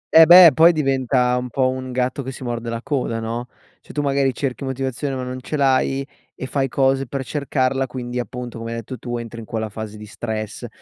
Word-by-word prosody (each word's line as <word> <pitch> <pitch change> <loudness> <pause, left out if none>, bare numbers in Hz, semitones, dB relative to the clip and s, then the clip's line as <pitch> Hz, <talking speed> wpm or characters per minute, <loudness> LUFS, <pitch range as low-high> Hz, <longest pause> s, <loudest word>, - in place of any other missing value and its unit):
Eh 160 0 +10
beh, 175 -1 +10
poi 165 +4 +6
diventa 130 -4 +1
un 125 0 -3
po' 130 +2 +1
un 130 0 -4
gatto 125 +2 -1
che 130 0 -5
si 130 - -9
morde 120 -1 -4
la 115 +1 -4
coda, 125 -6 -1
no, 115 +2 -4 0.3
cioè - - -13
tu 145 - -1
magari 140 -1 +2
cerchi 130 +1 -4
motivazione, 135 +1 -3
ma 130 - -4
non 125 0 -5
ce 150 +4 -4
l'hai, 135 0 +2 0.3
e - - -6
fai 135 +1 -1
cose 135 0 +1
per 135 +1 -4
cercarla, 135 -1 0
quindi 125 -1 -5
appunto 125 -1 -6
come 115 0 -5
hai - - -4
detto 115 +3 -7
tu, 120 -1 -4
entri 115 0 -7
in 110 - -9
quella 110 -1 -3
fase 105 0 -7
di 105 - -9
stress, 110 +1 -5
130 Hz, 220 wpm, -21 LUFS, 120-135 Hz, 0.3 s, Eh